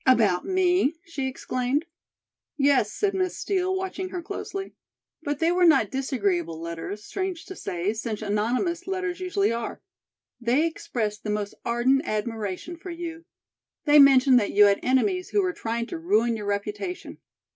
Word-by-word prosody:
"About 215 -8 +4
me?" 365 -4 +2
she 290 -6 -3
exclaimed. 255 +3 -1 0.7
"Yes," 275 -7 +3
said 405 - 0
Miss 370 -1 -1
Steel, 375 -1 0
watching 375 0 -3
her 360 -2 -5
closely. 390 +2 -5 0.5
"But 290 -2 -2
they 330 +3 +2
were 360 +1 +2
not 310 - +5
disagreeable 200 - -1
letters, 170 +5 -6
strange 375 -3 -4
to 380 - -8
say, 180 - -2
since 220 -1 -4
anonymous 245 - -1
letters 375 -2 -2
usually 370 - +1
are. 230 0 -4 0.6
They 250 +6 +2
expressed 220 -10 -3
the 210 - -4
most 210 -1 -2
ardent 245 +3 +2
admiration 215 - -3
for 365 +3 -9
you. 335 -1 -6 0.6
They 295 -1 +7
mentioned 265 -2 +7
that 205 - -2
you 205 +1 +7
had 200 0 +4
enemies 365 +9 +1
who 410 - +2
were 365 -1 0
trying 230 -4 -3
to 330 +7 -6
ruin 235 -8 +2
your 210 -2 -5
reputation." 205 - -4
270 Hz, 155 wpm, -25 LUFS, 215-355 Hz, 0.7 s, They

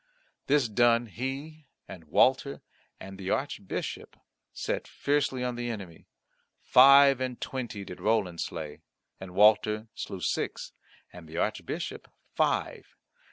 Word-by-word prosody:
This 140 -3 +3
done 115 +2 +3
he 135 +6 -6 0.2
and 85 -3 -11
Walter 130 - +2 0.4
and 95 0 -10
the 95 -1 -5
Archbishop 120 -7 -4 0.3
set - - -3
fiercely 140 -3 -1
on 125 -1 -1
the 120 0 -4
enemy. 95 -8 -8 0.6
Five 140 0 +7
and 130 -2 -3
twenty 120 -6 -5
did 90 - -10
Roland 105 -6 0
slay, 75 -2 -6 0.4
and 95 -1 -10
Walter 105 +1 +4
slew 95 - -6
six, - - -2 0.4
and 85 -3 -12
the 80 - -8
Archbishop - - -3 0.3
five. - - -1
115 Hz, 120 wpm, -28 LUFS, 95-130 Hz, 0.6 s, Five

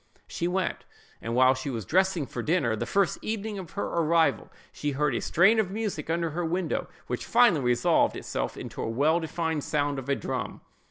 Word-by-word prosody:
She 170 - -3
went: 185 +1 -1 0.4
and 115 +1 -3
while 130 +1 +6
she 135 +2 -5
was 115 -6 -4
dressing 185 - +2
for 120 - -5
dinner, 145 -7 +1
the 105 - -4
first 200 -2 +1
evening 215 -1 -3
of 180 -4 -9
her 200 - -2
arrival, 165 0 +1 0.2
she 145 -1 -3
heard 145 0 +1
a 115 - -1
strain 200 +7 +4
of 205 -4 +1
music 200 -7 -4
under 165 0 0
her 175 +3 -2
window, 175 +2 -2 0.2
which - - -3
finally 230 - +4
resolved 120 -1 +3
itself - - -4
into - - -7
a - - -2
well 145 +8 +2
defined 160 -2 -2
sound 145 -2 -1
of 135 +1 -8
a 140 - +3
drum. 130 -2 -4
160 Hz, 200 wpm, -27 LUFS, 135-185 Hz, 0.4 s, while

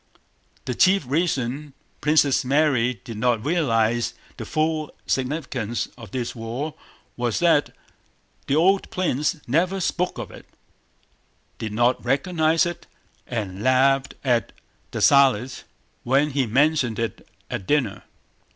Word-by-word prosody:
The 125 - -2
chief 185 +5 +4
reason 140 -2 -1 0.3
Princess 150 -2 +3
Mary 130 -4 +2
did 110 0 -7
not 120 -2 +1
realize 120 -8 +1 0.2
the - - -6
full 155 -1 0 0.2
significance 130 -4 -2
of 115 -3 -11
this 125 -3 -3
war 120 +7 -4 0.4
was 120 -2 -1
that 165 -4 +3 0.8
the 140 - +1
old 190 +5 +3
prince 150 -4 0
never 175 +9 +1
spoke 180 -2 -1
of 115 -6 -6
it, - - -13 1.1
did 110 - -4
not 120 +3 +1
recognize 160 +5 +2
it, 175 0 -6 0.4
and 100 -5 -4
laughed 130 +2 +3
at 120 -4 +1 0.4
Dessalles 135 -3 +3 0.4
when 140 +4 +2
he 135 -2 0
mentioned 135 -1 +2
it 115 -1 -4 0.2
at 95 - -4
dinner. 135 -9 +1
135 Hz, 120 wpm, -23 LUFS, 120-155 Hz, 1.1 s, chief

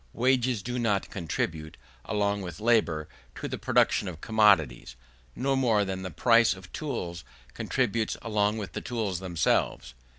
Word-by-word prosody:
Wages 125 -3 +1
do 125 +1 -3
not 105 -5 0
contribute, 80 -3 -3 0.3
along 100 -1 0
with 90 -1 -7
labour, 105 -9 +2 0.3
to - - -5
the - - -5
production - - +2
of 85 -3 -6
commodities, 90 - +3 0.4
no 135 +1 0
more 115 -6 +2
than 95 -1 -4
the 95 - -5
price 115 - +4
of 95 -1 -14
tools 90 - -4 0.3
contributes 115 - -1
along 105 -1 +1
with 100 -6 -5
the - - -4
tools 110 -7 -2
themselves. 85 -8 0
105 Hz, 145 wpm, -28 LUFS, 85-115 Hz, 0.4 s, price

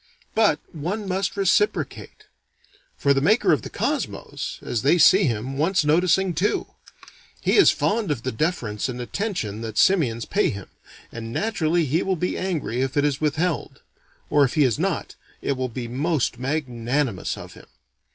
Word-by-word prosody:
But 215 -8 +3 0.2
one 185 +7 -4
must 190 +1 -1
reciprocate. 200 - 0 0.7
For 140 - +3
the 135 - +1
maker 215 - +3
of 145 - +1
the - - -8
Cosmos, - - -3
as 115 - -2
they 145 +6 +4
see 190 +4 +6
him, 125 +2 -2
wants 170 +1 +2
noticing 180 +4 +3
too; 180 +7 0 0.7
he - - +1
is 400 - +7
fond 215 -3 0
of 135 -6 -2
the 130 - -2
deference 120 - -2
and 125 -1 -5
attention 120 - -3
that 110 -2 -6
simians 125 - +3
pay - - +1
him, 100 -2 -7 0.4
and 115 -1 -7
naturally 175 - 0
he 155 +6 +1
will 190 - 0
be 180 +2 -2
angry 160 -10 -2
if 135 +1 -2
it 145 - +3
is 145 0 -1
withheld; 155 +4 -1 0.5
or 145 - +5
if 130 - 0
he 150 - +4
is 125 -5 +1
not, - - -2 0.3
it - - -2
will 130 -1 -2
be 120 0 -5
most 135 0 -1
magnanimous 130 - -2
of - - -10
him. - - -15
150 Hz, 170 wpm, -23 LUFS, 125-180 Hz, 0.7 s, is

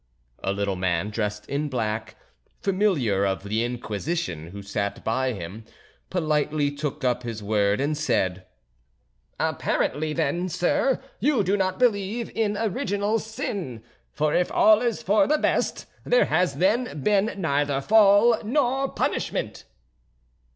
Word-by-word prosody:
A 95 - 0
little 100 -1 -1
man 90 +2 -1
dressed 105 -1 -3
in 145 +2 -2
black, 110 -4 -3 0.4
Familiar 180 - +1
of 95 -1 -1
the 110 +3 -1
Inquisition, 115 - -3
who 100 +3 -9
sat 100 0 -3
by 130 +3 0
him, 95 +3 -7 0.5
politely 150 -4 0
took 145 -1 -4
up 125 -1 +1
his 115 -3 -6
word 100 -1 +1
and 145 +3 0
said: 95 - -1 0.9
"Apparently, 155 +2 0
then, 170 +5 -1
sir, 180 +9 +1 0.2
you 275 -7 +2
do 195 +2 +1
not 185 -2 0
believe 225 -1 0
in 210 -2 0
original 210 -1 0
sin; 200 - -5 0.3
for 150 0 0
if 180 - +1
all 215 +1 +5
is 240 -3 -1
for 200 0 +3
the 305 - +3
best - - 0 0.2
there - - +3
has 180 0 +1
then 200 - 0
been 210 +2 +2
neither 145 -5 0
Fall 215 +6 +5
nor 270 +3 +1
punishment." - - -2
150 Hz, 135 wpm, -25 LUFS, -, 0.9 s, all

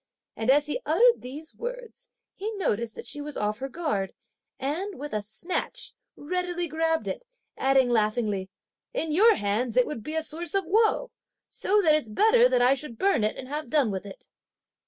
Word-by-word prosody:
and 225 +2 -2
as 290 +2 +5
he 300 +12 -2
uttered 485 0 +4
these 295 +6 -6
words, - - -7 0.2
he 420 +3 -4
noticed 235 - -1
that - - -7
she 290 - -2
was 295 0 -6
off 210 +1 -1
her 270 +1 -4
guard, 265 - -2 0.4
and, 340 +9 -3
with 290 -1 -7
a 215 - 0
snatch, 335 - -3 0.2
readily 350 +2 -2
grabbed 325 +1 0
it - - -3 0.3
adding 265 -1 +3
laughingly: 215 -4 0 0.5
"In 325 -10 -1
your 425 +7 +6
hands, 220 - -1
it 250 - +6
would 265 -7 -5
be 305 +7 -6
a 320 - 0
source 340 +5 -2
of 390 -2 +1
woe, 440 +6 +2 0.4
so 415 +1 +2
that 315 -3 +5
it's 300 -7 +1
better 445 - +5
that 245 - +3
I 255 +2 +6
should 275 -4 -4
burn 390 - +2
it, 215 - +1
and 255 - -7
have 295 -1 -5
done 270 -6 +2
with 195 +1 -5
it!" 195 - -12
300 Hz, 190 wpm, -27 LUFS, 235-365 Hz, 0.5 s, your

